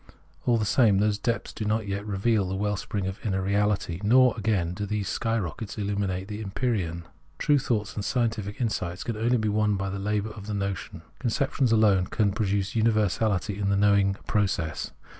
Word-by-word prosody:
All 120 -1 +4
the 110 - 0
same, 105 -2 +4
those 105 +1 +1
depths 115 +2 -2
do 110 - -4
not 105 0 0
yet 100 0 -2
reveal 100 0 +1
the 95 - -2
well 105 +1 0
spring 100 0 -3
of 95 +1 -5
inner 95 -3 0
reality; 100 -2 0
nor, 125 +3 +5
again, 100 -6 0
do 105 +2 -4
these 105 -1 -2
sky 115 +3 0
rockets 100 +2 -5
illumine 100 -2 -1
the 105 +1 -6
empyrean. 95 -5 -2 0.3
True 145 -1 +3
thoughts 115 -6 -1
and 105 - -4
scientific 110 -4 -1
insight 105 -7 -2
can 115 - -2
only 120 +3 +2
be 110 -1 -1
won 105 0 +2
by 95 0 -2
the 100 - -4
labour 105 +2 -1
of 105 -1 -10
the 105 - -2
notion. 100 -2 -4 0.2
Conceptions 130 +1 0
alone 105 -5 +4
can 105 -3 +1
produce 100 -2 -1
universahty 105 -3 +1
in 100 - +1
the 100 - +2
knowing 100 -1 +3
process. 95 -7 -1
105 Hz, 190 wpm, -26 LUFS, 95-110 Hz, 0.3 s, nor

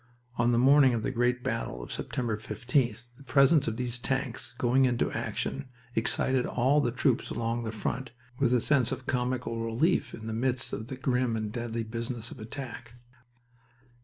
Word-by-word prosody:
On 120 0 +3
the 120 - +3
morning 135 0 +6
of 110 - -2
the - - -1
great 125 +1 +1
battle - - -3
of - - -9
September 120 -3 -2
15th 120 +1 -1
the 140 - -14
presence 140 +1 +4
of 115 0 -2
the 125 - -2
tanks 125 +1 -2
going 130 +2 +3
into 120 -2 +1
action 140 0 -3 0.3
excited 125 +3 +2
all 135 +5 +3
the 120 - 0
troops 125 0 +1
along 115 +1 -2
the 110 - -2
front 115 +4 -3 0.3
with 135 -3 +3
a 125 -2 +3
sense 130 -3 +3
of 130 -1 -4
comical 125 -2 -1
relief 120 +11 +1
in 110 - -10
the 110 - -3
midst 125 +2 0
of 110 +2 -4
the 130 - -5
grim 125 -2 +1
and 110 -1 -3
deadly 115 0 -3
business 115 +1 -5
of - - -10
attack. 120 0 -7
120 Hz, 180 wpm, -29 LUFS, 115-130 Hz, 0.3 s, morning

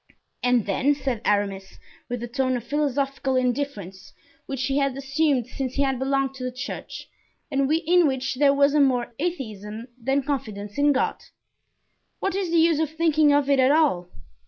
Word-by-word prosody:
"And 245 -3 +2
then," 270 +8 +1
said 265 -5 -3
Aramis, 200 -2 -1 0.3
with 245 -1 -3
the 240 - -4
tone 255 +1 0
of 235 - -7
philosophical 275 -1 -1
indifference 245 -7 -2 0.3
which 270 -2 -3
he 275 +2 +1
had 275 -1 0
assumed 275 -2 +1
since 260 0 -5
he 280 - +2
had 270 -2 0
belonged 270 0 0
to 255 - -7
the 255 - -2
church 250 0 -7 0.4
and 275 0 +1
in 335 +1 +3
which 265 -1 -1
there 275 +2 +4
was 280 0 +3
more 255 -5 +2
atheism 230 - -5
than 270 +3 +1
confidence 215 -6 -4
in 290 0 +4
God, 270 - 0 1.0
"what 390 - -1
is 385 -2 -2
the 335 - +2
use 325 -1 +4
of 315 -2 0
thinking 315 -2 +3
of 285 -1 +3
it 280 -1 +3
all? 280 - +2
270 Hz, 170 wpm, -24 LUFS, 245-290 Hz, 1.0 s, there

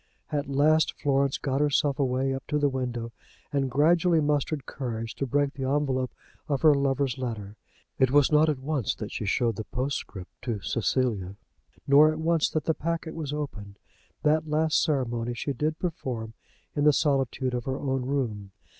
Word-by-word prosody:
At 145 -2 -2
last 155 +3 +3
Florence 140 -1 +1
got 135 0 -1
herself 145 -1 +2
away 135 0 +1
up 135 - -6
to 150 - 0
the 145 -1 +2
window, 125 -3 -3 0.4
and 135 -2 +1
gradually 165 +5 +3
mustered 145 -2 0
courage 115 -4 -4
to 135 - -3
break 140 +1 +1
the 130 -1 -3
envelope 135 -3 0 0.4
of 140 -1 -1
her 155 -2 +8
lover's 140 -2 0
letter. 110 -5 -5 0.4
It 130 - +4
was 145 +1 +4
not 155 +1 +5
at 150 - 0
once 135 -2 -1
that 105 - -6
she 110 - -4
showed 115 +2 +1
the 110 - -3
postscript 125 -8 -4
to 115 -4 -3
Cecilia, 105 -3 -1 0.5
nor 150 +3 +6
at 155 - -4
once 160 0 +2
that 155 - -1
the 160 - +1
packet 165 0 -3
was 155 -4 -4
opened. 110 -10 -5 0.5
That 155 +1 +2
last 155 +1 +2
ceremony 120 -6 -1
she 140 +4 -2
did 155 +4 -1
perform 125 -11 -4 0.4
in 145 - +1
the 150 - +6
solitude 135 -3 +1
of 120 -1 -3
her 130 0 -2
own 135 -2 -1
room. 115 -8 -2
135 Hz, 175 wpm, -27 LUFS, 125-150 Hz, 0.5 s, her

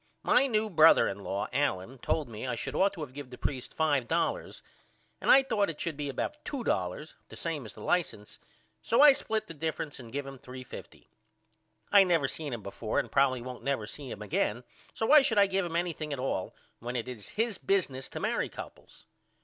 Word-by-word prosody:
My 275 - +4
new 220 -3 +1
brother 160 -1 +7
in 100 - -4
law 100 0 -3
Allen 130 -3 -1
told 150 +3 -1
me 115 +2 -6
I 125 - -1
should - - -5
ought 195 +1 +3
to 160 -5 -5
give 140 0 -9
the 125 - -10
preist 130 -3 -4
$5 160 - 0 0.6
and - - -1
I 270 - +8
thought 215 -7 +1
it 155 - -6
should 165 -3 -3
be 145 -1 -4
about 300 - -4
$2 150 - -2 0.2
the - - -10
same 160 -6 -3
as - - -11
the 105 - -10
license 145 -12 -1 0.4
so 230 - +1
I 290 0 +10
split 220 -4 -2
the 165 - -9
difference 155 -1 -4
and 115 -3 -10
give 140 +1 -3
him 135 -1 -9
$3.50. 130 0 -10 0.9
I 200 -1 +8
never 170 -7 +2
seen 150 +1 -4
him 115 -4 -5
before 105 +3 -4
and - - 0
probily 130 -3 +2
won't 125 0 -7
never 135 -6 -1
see 135 +4 -8
him 105 -2 -6
again 105 +3 -1 0.3
so 225 - -2
why 300 +5 +8
should 225 -5 0
I 200 - +7
give 195 -1 0
him 165 - -6
anything 165 -3 -2
at 140 - -2
all 125 -8 -2 0.2
when 120 +2 -5
it 120 0 -2
is 120 -5 -7
his 225 -1 -1
business 140 -10 0
to - - -6
marry - - 0
couples? - - -11
145 Hz, 205 wpm, -30 LUFS, 125-190 Hz, 0.9 s, I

